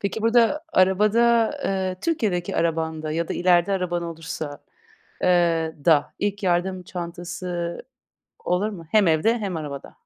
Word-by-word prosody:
Peki, 205 +2 -3
burada 235 +6 +3
arabada, 215 +5 +4
eee, 190 -1 -1
Türkiye'deki 210 - -1
arabanda 160 -2 -1
ya 165 +1 -2
da - - -2
ileride 175 +1 +3
araban 180 -2 -1
olursa 160 -3 -6 0.6
eee, 170 -3 +2
da 155 -4 +3
ilk 205 0 -2
yardım 185 +1 0
çantası 175 0 -5 0.6
olur 180 +4 0
mu? 180 -6 -9
Hem 210 -3 +4
evde, 170 +9 +3
hem 195 -6 -3
arabada? 145 -3 -7
180 Hz, 130 wpm, -23 LUFS, 165-200 Hz, 0.6 s, arabada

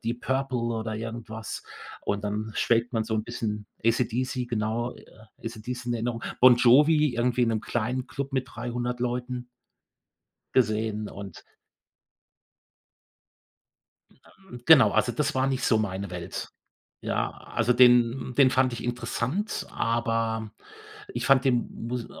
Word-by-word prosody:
Deep 120 +1 -2
Purple 130 -1 -1
oder 115 -2 -2
irgendwas. 110 -1 -6 0.4
Und 100 +1 -2
dann 105 +1 -3
schwelgt 120 +2 +1
man 110 -1 0
so 110 - -2
'n 110 0 -1
bisschen 105 -3 -4 0.2
AC/DC, 125 +2 0
genau, 115 +1 -2
e - - -16 0.4
AC/DC 120 +2 -6
in 120 - 0
Erinnerung, 115 0 -3 0.2
Bon 125 -1 +8
Jovi 150 +4 +5
irgendwie 125 +1 +1
in 120 - +3
'nem 110 -2 0
kleinen 120 +3 -2
Klub 140 +1 -5
mit 130 -1 -1
300 120 +1 -3
Leuten 125 0 -3 1.1
gesehen, 110 -3 +1
und 100 -3 -9 2.9
Hm, 180 -11 -13
genau, 160 -5 +8
also 120 - +2
das 150 +4 -1
war 130 0 +2
nicht 135 -1 -1
so 110 - +3
meine 100 -2 -3
Welt. 90 -1 -5 0.5
Ja, - - -1 0.2
also 120 +1 +3
den 125 0 +4
den 135 -2 +6
fand 130 -1 +2
ich 120 - -5
interessant, 125 - -2
aber 115 -1 -1 0.6
ich - - -3
fand 135 -1 +5
den 125 -3 +2 0.2
mus 120 -1 -3
120 Hz, 135 wpm, -27 LUFS, 110-125 Hz, 2.9 s, Bon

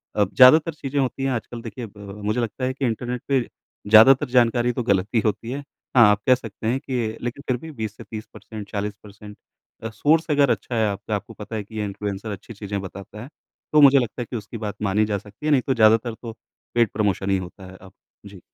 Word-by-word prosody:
अब 100 -2 +1
ज़्यादातर 150 +6 +7
चीज़ें 145 -1 -3
होती 135 +1 -2
हैं 135 - +1
आजकल 120 -1 -5
देखिए 115 +1 -7
अ, - - -12
मुझे 105 +3 -3
लगता 120 +3 -3
है 130 - -1
कि 135 0 -2
इंटरनेट 120 +1 -3
पे 135 -2 +3 0.5
ज़्यादातर 125 +6 +7
जानकारी 120 -1 +3
तो 125 - -2
गलत 100 -3 +1
ही - - +5
होती 110 +3 -1
है। 135 - -3 0.4
हाँ, 120 -2 +8
आप 105 0 0
कह 130 - +7
सकते 115 -3 -7
हैं 125 +4 +1
कि 120 -5 -3
लेकिन 120 +4 -5
फिर 130 - +1
भी 160 +6 -10
20 110 -6 -5
से - - -10
30% 110 -1 -9
40% 105 0 -7 0.5
अ, 115 - -3
सोर्स 150 +10 +2
अगर 145 -2 +4
अच्छा 120 - -3
है 110 -1 +2
आपका, 100 +1 -3
आपको 105 +2 -6
पता 105 +1 -8
है 105 - -3
कि 110 +2 -14
ये 105 - -1
इन्फ्लुएंसर 100 +1 -5
अच्छी 100 +3 -8
चीज़ें 100 -1 -5
बताता 100 +2 -9
है। 130 - -11 0.4
तो 150 - +6
मुझे 140 -1 +8
लगता 120 0 -3
है - - -3
कि - - -4
उसकी 105 +2 -8
बात 105 -2 -5
मानी 105 +2 +2
जा 105 -1 -1
सकती 105 +7 -12
है। 155 - +2
नहीं 140 -3 +4
तो 135 - +3
ज़्यादातर 115 0 +4
तो 115 -2 -7 0.4
पेड 120 -2 +3
प्रमोशन 100 -2 0
ही 95 - +3
होता 95 +1 -9
है 95 - -13
अब। 95 0 -15 0.3
जी। 100 -2 -12
110 Hz, 235 wpm, -23 LUFS, 105-125 Hz, 0.5 s, हाँ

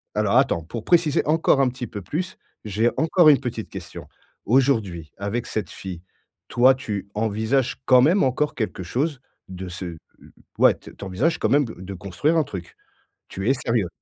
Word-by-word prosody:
Alors, - - +1
attends, 85 - +2
pour 110 +7 -7
préciser 165 -4 +3
encore 155 -2 +3
un 130 - +3
petit 125 -1 -6
peu 105 - -7
plus, 170 - -4 0.3
j'ai 110 +3 +1
encore 160 +1 +5
une 145 - +6
petite 120 -4 -5
question. - - -9 0.4
Aujourd'hui, 110 - +1
avec 100 +4 -3
cette 110 - -3
fille, 90 -3 -8 0.5
toi, 130 +2 +5
tu 105 -6 -5
envisages 110 +5 0
quand 130 -1 +6
même 170 +10 +4
encore 135 +3 0
quelque 110 -4 -3
chose 135 - -2 0.3
de 95 0 -7
ce, 90 +1 -6
heu, 85 -2 -6 0.6
ouais, - - +5
tu - - -13
envisages 110 - 0
quand - - 0
même, 145 0 +4
heu, - - -8
de 95 +1 -7
construire 100 - -1
un 160 - +4
truc? 95 -10 -8 0.5
Tu 95 +6 -2
es - - +5
sérieux? 115 -7 0
120 Hz, 180 wpm, -23 LUFS, 100-140 Hz, 0.6 s, une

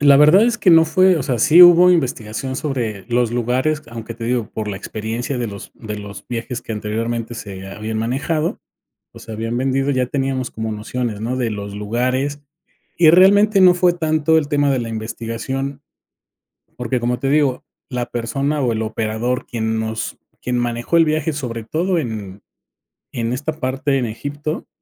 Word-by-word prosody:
La 140 -1 +6
verdad 155 +8 +7
es 240 0 +1
que 185 - +1
no 165 -1 +7
fue, 185 +3 +4
o 155 - -1
sea, 125 -2 -1
sí 155 +8 +7
hubo 175 +1 +8
investigación 130 -5 -1
sobre 120 -9 -3
los 120 -1 +1
lugares, 130 +6 0
aunque 115 0 -7
te 115 0 -7
digo, 120 -2 -1
por 110 -1 -4
la 100 - -3
experiencia 115 +6 -4
de 120 - -2
los 100 -1 -8
de 105 -2 -7
los 100 -1 -9
viajes 120 0 -4
que - - -7
anteriormente 115 +2 -3
se 95 -4 -8
habían 110 +3 -5
manejado, 145 +8 -1 0.5
o - - -13
se 110 - -10
habían 115 +2 -3
vendido, 135 +2 0
ya 130 -2 +1
teníamos 135 -1 -2
como 110 0 -4
nociones, 110 +1 -4
¿no?, 120 +3 -2
de 120 -3 0
los 100 -1 -6
lugares 130 +7 -1 0.6
y 165 -2 +6
realmente 200 +4 +6
no 180 -1 +8
fue 180 0 +3
tanto 160 -1 +2
el 150 - +1
tema 145 -1 +2
de 130 - +1
la 115 - -4
investigación 115 +5 -4 1.0
porque 125 +1 -1
como 120 +1 -1
te 135 - -2
digo, 140 -4 +1 0.2
la 125 -2 -3
persona 135 +6 -2
o 125 -4 +1
el 110 0 -2
operador 110 +3 -2
quien 110 -1 -2
nos, 110 0 -4 0.2
quien 125 0 -2
manejó 120 +6 -1
el 165 - +6
viaje 155 0 0
sobre 120 -6 -5
todo 175 +6 0
en 105 -7 -5 0.7
en 115 0 -2
esta 145 +5 -3
parte 135 +1 0
en 125 - -1
Egipto, 145 +7 -5
125 Hz, 180 wpm, -19 LUFS, 115-150 Hz, 1.0 s, hubo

